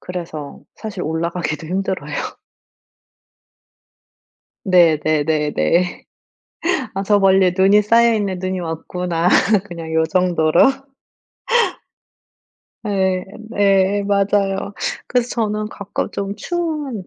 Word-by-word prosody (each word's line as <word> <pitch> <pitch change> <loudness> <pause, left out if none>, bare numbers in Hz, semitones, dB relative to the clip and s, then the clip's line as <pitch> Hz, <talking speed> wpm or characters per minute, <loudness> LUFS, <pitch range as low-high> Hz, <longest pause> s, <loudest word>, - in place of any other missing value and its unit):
그래서 165 -5 -7
사실 210 -5 -6
올라가기도 160 -1 -3
힘들어요. 180 -5 -3 2.5
네네네네. 155 - +2 0.9
'아 195 - -2
저 205 +1 +3
멀리에 190 -2 +4
눈이 195 +2 +5
쌓여있네. 220 -3 +3
눈이 185 0 -3
왔구나.' 170 +1 -2 0.4
그냥 165 -4 -8
요 160 0 +2
정도로. 170 -2 +2 2.3
예 190 -2 0 0.3
예 200 0 +3
맞아요. 200 0 0 0.3
그래서 245 -1 0
저는 215 -2 -2
가끔 200 0 -4
좀 200 -1 -4
추운 300 - -3
190 Hz, 195 characters per minute, -19 LUFS, 165-205 Hz, 2.5 s, 눈이